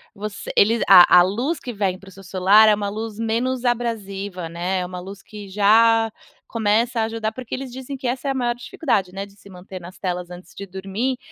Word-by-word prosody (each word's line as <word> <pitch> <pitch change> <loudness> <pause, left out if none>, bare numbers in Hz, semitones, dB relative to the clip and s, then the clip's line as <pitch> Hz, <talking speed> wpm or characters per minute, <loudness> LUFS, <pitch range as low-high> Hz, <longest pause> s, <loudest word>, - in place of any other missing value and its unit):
você 210 0 -7
eles 225 +3 +4
a 180 -3 +8
a - - +8
luz 245 - -2
que 245 - -7
vem 195 -3 -2
para 195 - -17
o - - -12
seu 195 +1 -14
celular 195 +4 +5
é - - +5
uma 205 -1 -3
luz 215 +1 -6
menos 240 +3 -1
abrasiva, 205 -7 -3
né, 175 +3 -2
é 180 - -2
uma 180 0 -7
luz 195 +2 -10
que 205 -1 -11
já 225 +3 +4 0.4
começa 230 +2 0
a - - +2
ajudar, 225 -1 -3
porque 250 +1 -6
eles 260 -1 -7
dizem 265 +2 -7
que 265 - -10
essa 255 +3 -3
é 275 - +1
a - - -1
maior 245 -2 0
dificuldade, 225 - -2
né, 195 +1 -5
de 200 0 -19
se 200 - -17
manter 185 0 -10
nas 180 +2 -12
telas 180 -2 -4
antes 180 +1 -12
de 200 - -8
dormir, 195 +7 -3
205 Hz, 230 wpm, -21 LUFS, 190-235 Hz, 0.4 s, a